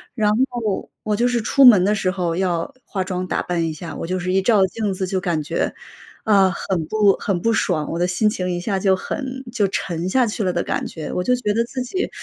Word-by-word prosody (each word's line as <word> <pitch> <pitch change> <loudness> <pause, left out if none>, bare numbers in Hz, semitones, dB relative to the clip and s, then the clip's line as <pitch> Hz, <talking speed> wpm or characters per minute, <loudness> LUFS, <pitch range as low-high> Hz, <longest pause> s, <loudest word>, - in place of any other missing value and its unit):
然 210 -3 +2 0.2
后 225 -5 -3
我 210 -1 0
就 240 - +2
是 245 -1 0
出 275 +5 +4
门 210 -7 +8
的 205 +3 +2
时 195 -3 0
候 175 -3 -2
要 180 +6 -1
化 190 -2 -2
妆 185 -1 -3
打 - - -1
扮 170 -2 -1
一 160 - -3
下， 160 +1 -8
我 - - -5
就 185 +1 -1
是 185 +1 -2
一 195 - +3
照 200 -1 +4
镜 210 +1 -2
子 190 0 -2
就 185 +1 -1
感 170 -4 -1
觉， 150 - -2 0.5
啊， 195 -3 +4
很 180 -3 -2
不 210 +1 +3
很 185 -4 -1
不 230 - +2
爽， 160 -8 0
我 170 - -3
的 180 - +2
心 200 +4 +2
情 185 -4 -3
一 175 - -2
下 190 +2 -1
就 190 0 +3
很 265 +6 -5
就 215 -5 +1
沉 175 -2 -3
下 255 +5 +3
去 215 -1 -2
了 185 -2 0
的 - - 0
感 - - -2
觉， 160 -2 -7
我 - - -1
就 250 +5 +2
觉 210 -4 -1
得 230 +2 +2
自 255 +2 -5
己 370 +10 -2
190 Hz, 270 characters per minute, -21 LUFS, 180-220 Hz, 0.5 s, 门